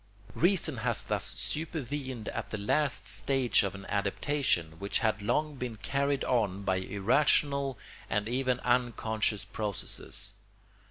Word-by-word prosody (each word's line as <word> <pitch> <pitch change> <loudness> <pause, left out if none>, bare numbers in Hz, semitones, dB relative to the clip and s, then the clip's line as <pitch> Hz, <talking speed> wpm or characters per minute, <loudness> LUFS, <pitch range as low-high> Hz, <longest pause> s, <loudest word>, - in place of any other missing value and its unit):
Reason 170 -5 +2
has 115 0 +1
thus - - -1
supervened 140 -6 -3
at - - -4
the 110 - -2
last 140 +8 +1
stage 135 -4 +2
of 100 -1 -2
an 100 0 -9
adaptation 100 - 0
which 100 +1 0
had 110 -3 +1
long 150 +7 0
been 125 -3 -4
carried 140 +7 0
on 100 -6 +1
by 95 -1 +1
irrational 135 +7 +2 0.3
and 105 +2 0
even 125 +1 0
unconscious 115 -4 +1
processes. 105 -4 -4
120 Hz, 125 wpm, -30 LUFS, 100-140 Hz, 0.3 s, Reason